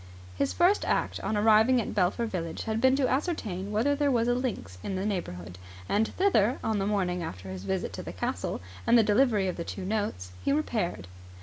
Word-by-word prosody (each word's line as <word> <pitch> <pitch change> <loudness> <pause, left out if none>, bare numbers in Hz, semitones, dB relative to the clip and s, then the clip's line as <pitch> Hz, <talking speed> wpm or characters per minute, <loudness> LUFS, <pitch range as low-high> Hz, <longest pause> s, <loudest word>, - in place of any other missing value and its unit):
His 140 - 0
first 360 +4 +3
act - - 0
on 215 - -1
arriving 220 +4 +5
at 225 - -3
Belpher 195 +4 +1
village 170 -6 -4
had 220 0 -2
been 260 +1 +5
to 270 -2 +2
ascertain 225 - -2
whether 230 +7 +2
there 290 0 +1
was 235 -3 +2
a 245 - +3
links 240 - -3
in 195 - -4
the 190 +1 -2
neighbourhood; 90 - -4 0.3
and 215 - +2
thither, 265 - +3
on 220 -2 0
the 195 - 0
morning 180 -4 0
after 95 - -6
his 95 0 -7
visit 95 -1 -2
to - - -5
the - - -7
castle - - -3 0.3
and 240 - +6
the 230 - +6
delivery 210 -2 +3
of 180 - -3
the 170 - -3
two 185 +2 -6
notes, 190 - -2
he - - +1
repaired. 215 - -1
210 Hz, 210 wpm, -28 LUFS, 180-245 Hz, 0.3 s, and